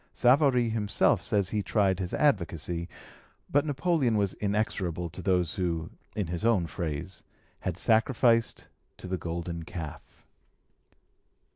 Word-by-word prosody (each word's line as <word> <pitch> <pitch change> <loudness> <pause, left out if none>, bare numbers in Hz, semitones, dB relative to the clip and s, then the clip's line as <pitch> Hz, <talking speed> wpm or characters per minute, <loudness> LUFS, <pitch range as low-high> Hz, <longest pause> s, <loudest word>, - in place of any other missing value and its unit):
Savary 125 -1 +4
himself 105 -3 +2
says 100 -3 +1
he 105 0 -1
tried 100 -3 +1
his 90 -2 -3
advocacy; 85 - 0 0.6
but 145 +2 +3
Napoleon 145 -5 +1
was 100 -2 +1
inexorable 95 -5 -2
to 90 - -7
those 90 -3 +1
who, 85 -3 -2 0.2
in 105 - -1
his 85 +2 -4
own 110 -7 +3
phrase, 80 +4 -5 0.4
had 90 -1 -3
sacrificed 115 +1 +2 0.3
to - - -11
the 95 -1 -3
golden 85 0 -4
calf. 80 -2 -9
95 Hz, 125 wpm, -28 LUFS, 85-115 Hz, 0.6 s, Savary